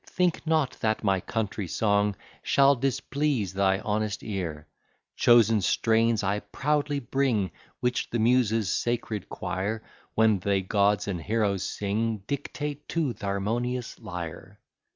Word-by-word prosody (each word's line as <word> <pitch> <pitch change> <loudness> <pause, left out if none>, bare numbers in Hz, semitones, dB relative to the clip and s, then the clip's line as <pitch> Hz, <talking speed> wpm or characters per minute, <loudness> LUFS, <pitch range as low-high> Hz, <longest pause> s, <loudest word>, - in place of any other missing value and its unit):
Think 180 -3 0
not, 155 -4 +2
that 110 0 0
my 95 -2 +2
country 105 -1 -3
song 105 +2 +1 0.3
Shall 140 0 +4
displease 135 -4 -1
thy 95 0 +2
honest 105 0 -2
ear. 85 -8 -4 0.5
Chosen 115 -3 +5
strains 115 +3 +2
I 100 +2 +1
proudly 145 +3 -1
bring, 120 -6 0 0.3
Which 125 +1 0
the 120 - -1
Muses' 115 -3 +2
sacred 115 -4 -2
choir, 105 +4 -3 0.3
When 110 -3 +4
they 100 +1 +1
gods 100 +2 +2
and 90 -4 -2
heroes 105 0 0
sing, 105 +1 -2
Dictate 145 +2 -4
to 155 -7 0
th' - - -21
harmonious 115 +5 -2
lyre. 85 -3 -7
110 Hz, 130 wpm, -27 LUFS, 100-125 Hz, 0.5 s, Chosen